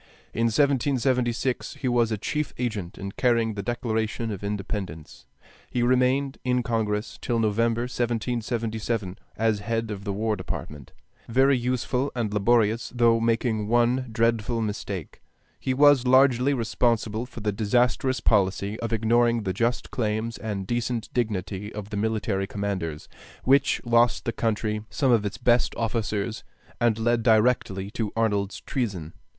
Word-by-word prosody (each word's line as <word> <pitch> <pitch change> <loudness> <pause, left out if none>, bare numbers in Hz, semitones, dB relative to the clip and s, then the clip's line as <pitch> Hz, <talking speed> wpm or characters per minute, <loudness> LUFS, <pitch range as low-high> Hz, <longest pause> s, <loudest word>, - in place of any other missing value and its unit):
In 115 - +1
1776 130 -1 +1
he 130 - -4
was 120 -2 +2
a 110 - 0
chief 150 +8 -3
agent 105 -8 -3
in 100 0 -5
carrying 115 -2 +1
a 100 - -3
declaration 110 0 -2
of 100 -1 -6
independence. 100 - -5 0.4
He 120 - 0
remained 130 +2 +2
in 125 -1 +1
Congress 110 -1 -2
till 120 - -1
November, 115 +1 +1
1777, 115 -4 -2 0.2
as 110 -1 +1
head 115 +1 -2
of 100 -1 -6
the 100 - -2
War 110 +2 0
Department, 75 -7 -7 0.4
very 135 +4 +4
useful 125 +2 -1
and 110 -4 -2
laborious 115 +1 +2
though 115 -1 +4
making 115 -2 0
one 120 +3 +2
dreadful 115 0 +1
mistake: 100 -5 -4 0.4
he 130 - -2
was 140 -1 +5
largely 130 +1 +4
responsible 115 -1 0
for 120 - -10
the 105 0 0
disastrous 120 +5 +1
policy 100 +1 +1
of 115 -1 -3
ignoring 115 +1 +2
the 95 -2 -1
just 115 +5 -1
claims 110 -1 -2
and 105 -4 -4
decent 120 0 -2
dignity 105 -3 -2
of 105 -1 -7
the 105 - -3
military 105 -2 -1
commanders, 95 -7 -4 0.4
which 135 +1 +3
lost 120 0 +3
the 115 - -1
country 105 -2 -1
some 135 -3 +1
of 110 -3 +3
its 100 - -6
best 120 0 +2
officers 110 -1 -2 0.4
and 115 -2 +2
led 115 +1 +1
directly 110 -3 +2
to 110 -2 -3
Arnold's 105 -3 0
treason. 100 - -3
115 Hz, 145 wpm, -25 LUFS, 105-120 Hz, 0.4 s, was